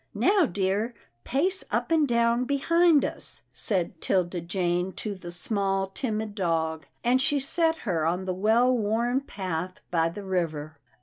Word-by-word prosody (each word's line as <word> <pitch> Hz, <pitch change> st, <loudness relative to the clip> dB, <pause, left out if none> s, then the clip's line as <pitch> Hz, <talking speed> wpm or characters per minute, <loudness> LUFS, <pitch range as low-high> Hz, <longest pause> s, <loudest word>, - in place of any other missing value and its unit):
" -, -, -46 dB, 0.2 s
Now 390 Hz, -6 st, +4 dB
dear, 200 Hz, +5 st, -1 dB, 0.3 s
pace 365 Hz, +9 st, 0 dB
up -, -, -1 dB
and 315 Hz, -3 st, +4 dB
down 235 Hz, 0 st, +2 dB
behind 320 Hz, +3 st, +3 dB
us," -, -, -5 dB
said 180 Hz, -5 st, -1 dB
Tilda 180 Hz, -2 st, 0 dB
Jane 180 Hz, +1 st, -1 dB
to 210 Hz, -, -4 dB
the 185 Hz, -3 st, -9 dB
small 195 Hz, +2 st, +1 dB
timid 215 Hz, -1 st, -3 dB
dog, 160 Hz, -6 st, -1 dB, 0.2 s
and 250 Hz, +2 st, +3 dB
she 290 Hz, +1 st, +2 dB
set 325 Hz, +4 st, +2 dB
her 170 Hz, -7 st, 0 dB
on 175 Hz, +4 st, 0 dB
the 185 Hz, -, -1 dB
well 225 Hz, +7 st, +3 dB
worn 235 Hz, +4 st, +1 dB
path 185 Hz, -7 st, -4 dB
by 165 Hz, -1 st, +2 dB
the 200 Hz, +5 st, -8 dB
river. 160 Hz, -5 st, -3 dB
200 Hz, 160 wpm, -27 LUFS, 175-250 Hz, 0.3 s, Now